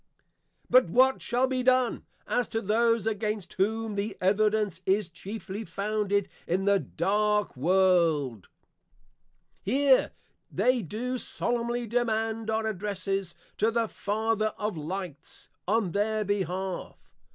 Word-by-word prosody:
But 255 -8 +5
what 260 +7 +4
shall 245 +2 +1
be 260 -1 -1
done, 255 -1 +2 0.2
as 245 -1 0
to 225 - -2
those 230 +1 +2
against 215 -2 -2
whom 220 +3 0
the 200 0 -3
evidence 205 -1 +1
is 195 -1 +2
chiefly 195 +4 -7
founded 205 +1 -1 0.2
in 185 +3 0
the 200 0 +4
dark 210 +4 0
world? 160 - +2 1.1
Here 265 +5 +3 0.4
they 250 -1 +2
do 245 +8 -3
solemnly 240 0 -1
demand 225 -1 -1
our 220 0 0
Addresses 195 -2 -2 0.2
to 220 - +3
the 230 0 0
Father 215 +1 -1
of 210 -2 -2
Lights, 165 0 -6 0.2
on 210 -2 +1
their 215 +3 0
behalf. 190 -2 -2
210 Hz, 120 wpm, -28 LUFS, 190-225 Hz, 1.1 s, But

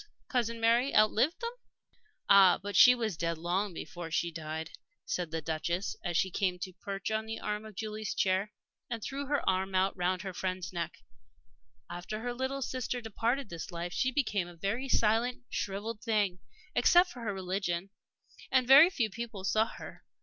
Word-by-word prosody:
Cousin 230 -2 0
Mary 235 +4 +3
outlived 215 +9 +3
them." 470 0 -2 0.8
"Ah, 195 -3 +7
but 200 0 -6
she 250 +6 +9
was 225 -6 -2
dead 165 0 -2
long 180 +5 -1
before 165 0 -7
she 170 +1 0
died," 160 0 -5 0.3
said 175 -2 -2
the 160 0 -4
Duchess 170 +5 -2
as 175 -2 -1
she 190 - +1
came 185 -1 0
to 185 +1 -6
perch 195 +3 -5
on 220 0 -1
the 225 0 -4
arm 210 +1 -3
of 215 -2 -11
Julie's 215 0 -4
chair, 190 +2 +1 0.4
and 230 -3 -4
threw 280 +1 -4
her 290 0 -1
arm 190 +1 +1 0.2
round 180 +1 -1
her 190 -2 -5
friend's 185 -2 -3
neck. 170 -1 -4 0.9
"After 180 +5 -6
her 245 +1 -3
little 260 +2 -2
sister 255 0 -3
departed 230 +2 -1
this 170 -1 -6
life 175 0 -5
she 260 - +1
became 210 -10 0
a 175 - -12
very 210 +10 -2
silent, 230 +3 +2
shrivelled 210 +3 -3
thing 205 -5 0 0.3
except 350 +7 +5
for 250 - -10
her 230 -3 -2
religion 190 -1 -3 0.6
and 255 -2 +3
very 280 +6 +9
few 235 - -1
people 225 -2 -6
saw 215 +3 +2
her. - - -10
205 Hz, 175 wpm, -31 LUFS, 180-235 Hz, 0.9 s, she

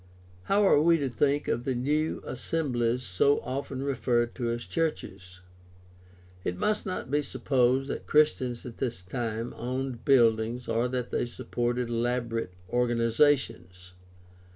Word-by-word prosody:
— 90 0 -26
How 205 +1 +4
are 150 -6 +5
we 165 +1 +5
to 140 -4 -1
think 140 +4 +1
of 120 - -1
the 130 0 -1
new 150 +6 0
assemblies 125 -6 -1
so 125 +8 +2
often 135 0 -4
referred 120 -3 0
to 120 -2 -2
as 120 +1 -3
"churches"? 95 - -3 1.0
It 90 - -2
must 210 - 0
not 185 -8 -4
be 145 +1 +2
supposed 135 -1 +1
that - - -6
Christians 130 -6 +2
at 120 -2 -9
this 120 -8 -3
time 115 +4 -4
owned 125 0 -4
buildings 120 -2 +3
or 115 +2 +1
that 125 -1 -3
they - - 0
supported 120 0 -2
elaborate 115 -4 -1
organizations. 115 -6 +1
125 Hz, 140 wpm, -28 LUFS, 115-140 Hz, 1.0 s, are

